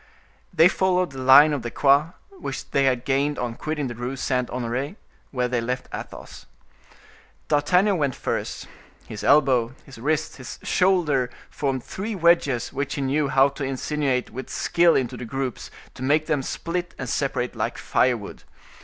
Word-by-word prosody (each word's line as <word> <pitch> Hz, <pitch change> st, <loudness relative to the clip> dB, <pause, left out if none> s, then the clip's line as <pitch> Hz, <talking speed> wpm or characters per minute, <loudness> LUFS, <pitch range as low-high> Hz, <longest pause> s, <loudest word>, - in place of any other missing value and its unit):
They 170 Hz, -2 st, +6 dB
followed 185 Hz, -3 st, +1 dB
the 135 Hz, -, -8 dB
line 145 Hz, +4 st, +7 dB
of 140 Hz, -, -2 dB
the 120 Hz, -, -4 dB
Quai, 140 Hz, +6 st, +3 dB, 0.2 s
which 385 Hz, -, -7 dB
they 140 Hz, -, +2 dB
had 125 Hz, -2 st, +1 dB
gained 140 Hz, +2 st, +1 dB
on 120 Hz, -2 st, -3 dB
quitting 155 Hz, +3 st, -3 dB
the 120 Hz, -, -4 dB
Rue 120 Hz, +3 st, -4 dB
Saint 125 Hz, -1 st, -1 dB
Honore, 125 Hz, -, -3 dB, 0.3 s
where 125 Hz, -2 st, -1 dB
they 125 Hz, -1 st, -1 dB
left 125 Hz, +2 st, -3 dB
Athos. -, -, -9 dB, 1.0 s
D'Artagnan 180 Hz, +6 st, +3 dB
went 140 Hz, -4 st, 0 dB
first; -, -, -4 dB, 0.4 s
his 105 Hz, -, -7 dB
elbow, 130 Hz, -4 st, +3 dB
his 135 Hz, -4 st, -13 dB
wrist, 155 Hz, +4 st, -1 dB
his 130 Hz, -3 st, -8 dB
shoulder 165 Hz, -9 st, +2 dB, 0.2 s
formed 135 Hz, -3 st, -2 dB
three 210 Hz, +3 st, -5 dB
wedges 170 Hz, -8 st, +2 dB
which 140 Hz, 0 st, -3 dB
he 140 Hz, -, -3 dB
knew 140 Hz, +2 st, +1 dB
how 135 Hz, 0 st, +4 dB
to 140 Hz, -, -7 dB
insinuate 135 Hz, -1 st, -1 dB
with 130 Hz, +3 st, -7 dB
skill 170 Hz, -1 st, +3 dB
into 125 Hz, -1 st, -1 dB
the -, -, -7 dB
groups, 130 Hz, +1 st, -4 dB, 0.2 s
to -, -, -12 dB
make 150 Hz, +4 st, +2 dB
them 150 Hz, -3 st, 0 dB
split 175 Hz, +6 st, -4 dB
and 130 Hz, -, -5 dB
separate 125 Hz, -1 st, -1 dB
like -, -, -2 dB
firewood. 120 Hz, -5 st, 0 dB
135 Hz, 165 wpm, -24 LUFS, 125-155 Hz, 1.0 s, line